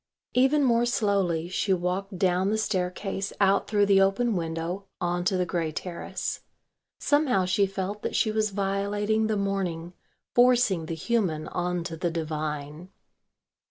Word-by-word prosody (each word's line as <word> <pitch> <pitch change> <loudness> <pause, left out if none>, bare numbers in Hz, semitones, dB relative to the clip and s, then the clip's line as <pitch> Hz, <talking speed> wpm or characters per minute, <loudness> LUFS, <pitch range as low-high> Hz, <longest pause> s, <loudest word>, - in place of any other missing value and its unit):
Even 270 +4 +4
more 240 -2 +3
slowly 195 -8 +1
she 190 +2 0
walked 185 +2 -2
down 185 +1 +2
the 215 - +1
staircase 195 -1 -2
out 195 0 +3
through 205 -1 +3
the 195 -1 +5
open 200 +4 +2
window 170 +3 -3
on 175 0 -1
to 190 -1 +2
the 180 - +1
grey 165 -2 -2
terrace. 170 +2 -4 0.6
Somehow 285 -11 +2
she 195 +2 +2
felt 195 +2 -4
that - - -3
she 220 - +2
was 215 0 +1
violating 205 +2 0
the 215 -1 0
morning, 185 -4 -2 0.4
forcing 240 -9 +4
the 165 - -3
human 165 -4 -1
on 180 -1 -2
to 165 -1 -5
the 170 +2 -1
divine. 155 0 -4
195 Hz, 150 wpm, -27 LUFS, 175-210 Hz, 0.6 s, the